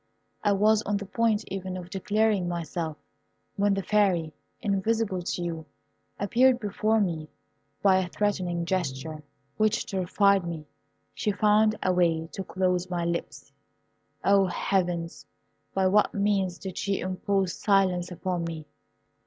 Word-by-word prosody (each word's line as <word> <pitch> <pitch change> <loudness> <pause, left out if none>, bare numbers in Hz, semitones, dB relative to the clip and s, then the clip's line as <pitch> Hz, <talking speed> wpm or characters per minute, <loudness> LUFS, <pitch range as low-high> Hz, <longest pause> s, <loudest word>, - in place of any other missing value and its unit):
I 205 - +3
was 210 +2 +4
on 205 -2 -1
the 200 - -6
point 220 +1 +1
even 190 -1 -4
of 180 0 -9
declaring 205 0 +1
myself, 165 -2 -3 0.6
when 200 0 +2
the 195 - -2
Fairy, 185 -7 +2 0.3
invisible 200 -1 0
to 175 0 -3
you, 165 -2 -4 0.5
appeared 245 +5 +4
before 215 +1 +1
me. 165 -6 -1 0.5
By 190 -2 +5
a 185 - -1
threatening 180 -3 -1
gesture, 155 -4 -2 0.4
which 215 -1 +2
terrified 195 +1 +2
me, 165 -3 -5 0.5
she 210 - -1
found 215 +1 +3
a 185 - +2
way 165 -2 +2
to 195 - -5
close 185 -1 0
my 175 -1 -1
lips. 170 0 -4 0.7
O, 195 -1 +4
heavens! 175 -2 -1 0.5
by 190 -1 +2
what 205 +3 +3
means 200 -3 +1
did 190 -2 -6
she 200 -1 -1
impose 185 0 -1
silence 185 -3 +2
upon 180 0 -3
me? 160 -2 -6
190 Hz, 135 wpm, -27 LUFS, 175-205 Hz, 0.7 s, By